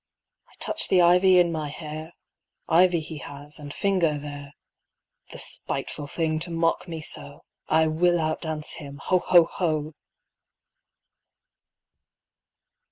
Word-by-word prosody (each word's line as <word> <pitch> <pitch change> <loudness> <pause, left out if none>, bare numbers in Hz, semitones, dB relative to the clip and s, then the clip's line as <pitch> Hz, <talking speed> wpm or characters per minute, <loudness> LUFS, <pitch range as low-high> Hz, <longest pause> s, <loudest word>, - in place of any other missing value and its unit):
I - - -23
touch - - +1
the 185 - +4
ivy 180 +2 +6
in 175 -1 +4
my 155 -2 -3
hair; 155 +2 -7 0.5
Ivy 175 0 +4
he 155 0 -7
has 145 +2 -8
and 145 -1 -8
finger 175 -4 +1
there. 145 -1 -8 0.8
The - - -8
spiteful 145 - -4
thing 155 +1 -1
to 175 +2 -4
mock 165 +2 0
me 165 -2 -5
so!I 150 +1 -2
will 175 +3 +2
outdance 155 -1 -3
him! 140 -2 -9
Ho, 180 +5 +1
ho, 175 -1 +6
ho! 155 -3 -2
160 Hz, 120 wpm, -25 LUFS, 150-175 Hz, 0.8 s, ivy